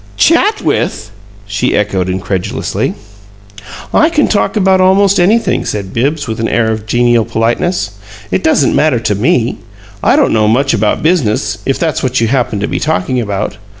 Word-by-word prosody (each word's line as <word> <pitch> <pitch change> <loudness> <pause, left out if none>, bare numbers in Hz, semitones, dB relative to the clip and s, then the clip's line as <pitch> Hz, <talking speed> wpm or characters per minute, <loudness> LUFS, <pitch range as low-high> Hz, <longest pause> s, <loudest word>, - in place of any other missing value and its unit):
"'CHAT 395 +6 +2
with'!" 105 - -2 0.3
she 100 0 -1
echoed, 95 -3 0
incredulously. 95 0 -2 1.0
"I 315 - +4
can 300 -3 +1
talk 215 +1 0
about 190 -2 +3
almost 195 +1 +3
anything," 215 +6 +2
said 100 -2 -4
Bibbs 140 +5 -1
with 110 -1 -4
an 115 - 0
air 115 -1 +1
of 110 -1 -5
genial 120 0 +2
politeness. 115 - -1 0.4
"It 190 - 0
doesn't 150 -3 +2
matter 150 -6 +2
to 110 -2 -1
ME. 115 +3 0 0.4
I - - +3
don't - - +2
know 110 -1 +2
much 135 +6 +2
about 105 -2 0
business 110 -11 0
if 135 - +1
that's 160 -4 -1
what 130 -1 0
you 115 -1 +1
happened 120 -5 -1
to 105 - -1
be - - -3
talking 120 +8 -1
about. 100 -3 -3
120 Hz, 170 wpm, -13 LUFS, 105-170 Hz, 1.0 s, I